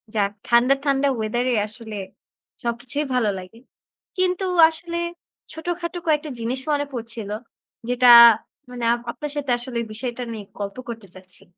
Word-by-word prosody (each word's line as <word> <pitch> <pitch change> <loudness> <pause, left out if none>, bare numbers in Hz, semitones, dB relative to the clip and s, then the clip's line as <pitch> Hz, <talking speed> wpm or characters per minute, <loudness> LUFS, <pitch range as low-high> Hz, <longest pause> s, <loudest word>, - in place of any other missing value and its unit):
যাক 200 -2 +1 0.2
ঠান্ডা, 240 +3 +5
ঠান্ডা 280 0 +2
ওয়েদারে 240 +3 0
আসলে 220 -1 -9 0.7
সবকিছুই 245 +5 -2
ভালো 245 -4 +2
লাগে। 185 +5 -12 0.6
কিন্তু 370 +1 +1 0.2
আসলে 340 +1 -5 0.5
ছোটখাটো 345 +2 -4
কয়েকটা 305 0 +1
জিনিস 235 +3 -1
মনে 290 0 +1
পড়ছিল 230 -3 -6 0.6
যেটা 245 0 +6 0.6
মানে 245 -1 -7 0.3
আপনার 295 +3 -6
সাথে 280 -3 -2
আসলে 240 -1 -4
বিষয়টা 240 +2 -4
নিয়ে 215 -3 -7
গল্প 200 +1 -5
করতে 225 -3 -7
চাচ্ছি। 185 0 -11
245 Hz, 130 wpm, -23 LUFS, 225-290 Hz, 0.7 s, যেটা